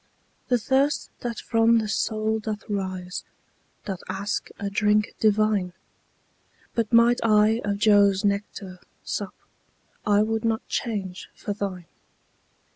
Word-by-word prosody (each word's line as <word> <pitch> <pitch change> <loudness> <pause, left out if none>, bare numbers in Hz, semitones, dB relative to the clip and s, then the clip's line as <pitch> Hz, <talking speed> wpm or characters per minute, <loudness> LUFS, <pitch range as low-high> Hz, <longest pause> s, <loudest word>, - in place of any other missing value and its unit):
The 250 - +3
thirst 270 +5 +1
that 235 -2 -4
from 230 0 +3
the 220 -1 0
soul 215 +1 0
doth 215 -1 -5
rise, 185 -3 -3 0.6
Doth 190 -4 -4
ask 200 +3 -3
a 200 - -4
drink 210 +1 +2
divine: 215 -4 +2 1.0
But 230 -2 -1
might 235 +1 +5
I 215 +1 +4
of 205 0 -1
Jove's 200 -1 +4
nectar 200 -2 -2 0.2
sup, - - -4 0.7
I 205 0 +4
would 220 +1 -1
not 225 -1 -1
change 195 -5 -3
for 205 - -4
thine. 195 -4 -4
210 Hz, 120 wpm, -25 LUFS, 200-225 Hz, 1.0 s, might